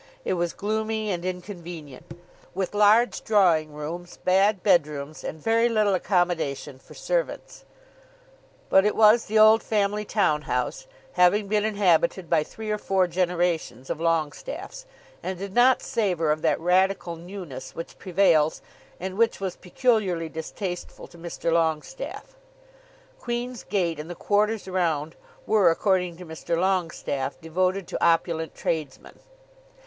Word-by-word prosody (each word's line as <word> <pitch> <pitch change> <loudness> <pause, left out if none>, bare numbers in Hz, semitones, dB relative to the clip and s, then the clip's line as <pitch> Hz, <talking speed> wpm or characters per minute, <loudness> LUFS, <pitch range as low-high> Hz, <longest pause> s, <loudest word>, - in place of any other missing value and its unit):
It - - 0
was 175 -1 -1
gloomy 220 0 -2
and 175 -2 -3
inconvenient, 175 -5 -7 0.4
with 190 0 -2
large 210 +3 +4
drawing 175 -8 +3
rooms, 165 +4 -7
bad 195 +1 +3
bedrooms, 155 -6 +1
and 160 - -6
very 230 +6 +2
little 215 -3 +2
accommodation 175 -7 -1
for - - -16
servants. - - -3 1.0
But 190 - +5
it 210 - +1
was 220 +2 +5
the 220 - 0
old 215 +1 +7
family 210 -1 0
town 185 -8 +1
house, 125 - -3 0.3
having 185 +3 +3
been 210 +1 +1
inhabited 195 -2 +1
by 165 -2 +4
three 215 +6 -7
or 210 - -1
four 190 -2 +2
generations 175 -7 -1
of - - -3
Longestaffes, 165 - -2 0.4
and 190 - -4
did 195 +1 -6
not 250 +3 +4
savour 180 -10 0
of 155 +1 -1
that - - +1
radical 180 0 +1
newness 170 -7 -9
which 165 - -8
prevails, 170 -5 +2 0.4
and 190 +2 -5
which 230 0 +2
was 190 -2 -3
peculiarly 185 -5 0
distasteful 175 +3 -6
to 170 - -16
Mr. 170 0 -3
Longestaffe. 170 - -2 0.8
Queen's 240 0 -4
Gate 170 -6 -1
and 155 +2 -7
the 175 - -6
quarters 210 +3 0
around 165 -4 -1 0.3
were, 210 -5 +4
according 180 0 +1
to 180 - -10
Mr. 160 +1 -3
Longestaffe, 170 -7 -1
devoted 185 +3 -1
to - - -4
opulent 165 -1 +1
tradesmen. 155 -5 -4
180 Hz, 135 wpm, -25 LUFS, 165-210 Hz, 1.0 s, old